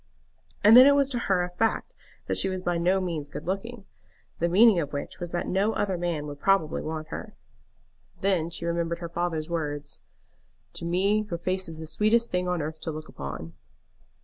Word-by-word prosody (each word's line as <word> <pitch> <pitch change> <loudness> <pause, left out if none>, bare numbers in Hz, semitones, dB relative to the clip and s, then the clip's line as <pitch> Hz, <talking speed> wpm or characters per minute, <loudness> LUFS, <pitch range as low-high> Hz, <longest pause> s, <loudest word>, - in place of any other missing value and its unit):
And 215 +2 +8
then 255 +2 +10
it 285 - +6
was 280 -1 +2
to 245 - -1
her 185 -2 +3
a 175 - -4
fact 225 +5 -1 0.3
that - - -1
she 190 - +2
was 185 -1 -4
by 175 -1 0
no 180 +3 +2
means 165 -6 -3
good - - -7
looking, 200 +4 -4 0.5
the 170 - +1
meaning 205 +1 +6
of 145 -3 -3
which 145 - -5
was 175 -1 -5
that 175 - -2
no 200 +4 +1
other 195 -2 0
man 170 -4 -2
would 145 -1 -7
probably 190 -3 +2
want 155 0 -5
her. 215 +5 -7 0.9
Then 180 -4 +1
she 170 0 -4
remembered 170 0 -1
her 170 -1 -6
father's 170 -2 -2
words, 145 -4 -4 0.7
"To 170 - -6
me 200 +5 +1
your 170 - -2
face 185 +1 -2
is 160 - -8
the 160 - -7
sweetest 220 +7 +2
thing 180 0 0
on 180 -3 -1
earth 155 +1 -5
to 160 - -4
look 155 0 -8
upon." 75 +4 -7
175 Hz, 200 wpm, -27 LUFS, 160-195 Hz, 0.9 s, then